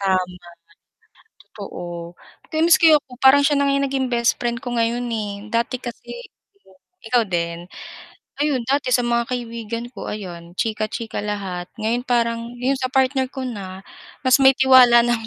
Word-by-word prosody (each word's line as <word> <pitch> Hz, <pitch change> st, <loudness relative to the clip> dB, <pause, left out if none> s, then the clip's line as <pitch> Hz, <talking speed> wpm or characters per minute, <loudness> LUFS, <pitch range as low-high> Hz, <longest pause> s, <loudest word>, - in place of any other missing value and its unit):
Tama. 185 Hz, -2 st, 0 dB, 1.1 s
Totoo 175 Hz, -4 st, -8 dB, 0.3 s
kaya 315 Hz, +1 st, 0 dB
miski 330 Hz, -1 st, +6 dB
ako 265 Hz, -4 st, -6 dB
yu -, -, -40 dB
parang 270 Hz, +2 st, +7 dB
siya 290 Hz, 0 st, +3 dB
na 280 Hz, -, +3 dB
nga 275 Hz, 0 st, +2 dB
naging 265 Hz, -1 st, -1 dB
best 235 Hz, 0 st, +2 dB
friend 235 Hz, -1 st, -1 dB
ko 245 Hz, -, -4 dB
ngayon 235 Hz, +1 st, 0 dB
eh, 215 Hz, -3 st, -3 dB, 0.2 s
dati 235 Hz, +2 st, 0 dB
kasi 240 Hz, -2 st, -9 dB, 1.0 s
ikaw 235 Hz, +1 st, +2 dB
din? 170 Hz, -1 st, -2 dB, 0.8 s
Ayun 290 Hz, -4 st, +1 dB
dati 275 Hz, -1 st, +1 dB
sa 245 Hz, -, +4 dB
mga 235 Hz, 0 st, 0 dB
kaibigan 235 Hz, -2 st, -4 dB
ko -, -, -8 dB
ayun, 175 Hz, -4 st, -8 dB
chika, 215 Hz, -1 st, -1 dB
chika 225 Hz, -1 st, -5 dB
lahat 190 Hz, -4 st, -4 dB
ngayon 225 Hz, +3 st, -1 dB
parang 235 Hz, -2 st, -1 dB
yun 255 Hz, +3 st, 0 dB
sa 255 Hz, -1 st, -2 dB
partner 265 Hz, 0 st, +2 dB
ko 265 Hz, -, -7 dB
na, 195 Hz, -5 st, -7 dB, 0.4 s
mas 255 Hz, +1 st, +6 dB
may 265 Hz, 0 st, +7 dB
tiwala 255 Hz, -3 st, +7 dB
na 240 Hz, -1 st, +1 dB
ko 225 Hz, -, -10 dB
235 Hz, 165 wpm, -21 LUFS, 210-260 Hz, 1.1 s, parang